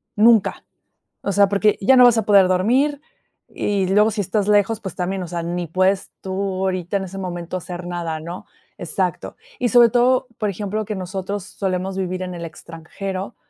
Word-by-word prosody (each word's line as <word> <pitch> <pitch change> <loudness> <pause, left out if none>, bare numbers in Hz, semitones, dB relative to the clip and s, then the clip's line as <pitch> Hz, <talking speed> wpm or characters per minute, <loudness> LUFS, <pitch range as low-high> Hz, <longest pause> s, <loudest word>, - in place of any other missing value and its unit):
nunca, 220 -1 +4 0.6
o 200 - -1
sea, 200 0 +4
porque 205 +1 +2
ya 260 +7 +5
no 250 - +8
vas 240 -2 +6
a 220 - -1
poder 200 -3 +6
dormir 255 +11 +2 0.5
y 200 -2 -1
luego 210 +3 +4
si 215 0 -3
estás 200 +1 -1
lejos, 210 +1 +3
pues, 190 -5 -6
también, 185 +1 -3
o - - -5
sea, 170 0 -4
ni 175 +1 -3
puedes 185 +3 +1
tú 190 - -6 0.3
ahorita 185 +1 -1
en 195 - -5
ese 190 +1 -9
momento 175 -1 -5
hacer 175 0 -7
nada, 170 -3 -4
¿no? 170 +3 -8 0.3
Exacto, - - -3 0.2
y 245 - 0
sobre 240 -1 +7
todo, 250 +2 +2
por 210 -2 0
ejemplo, 205 +2 -3
que 210 +1 -4
nosotros 190 +1 -4
solemos 190 -1 -3
vivir 185 -1 -3
en 180 -1 -5
el 170 -1 -6
extranjero, 185 +5 -7
195 Hz, 185 wpm, -21 LUFS, 180-210 Hz, 0.6 s, no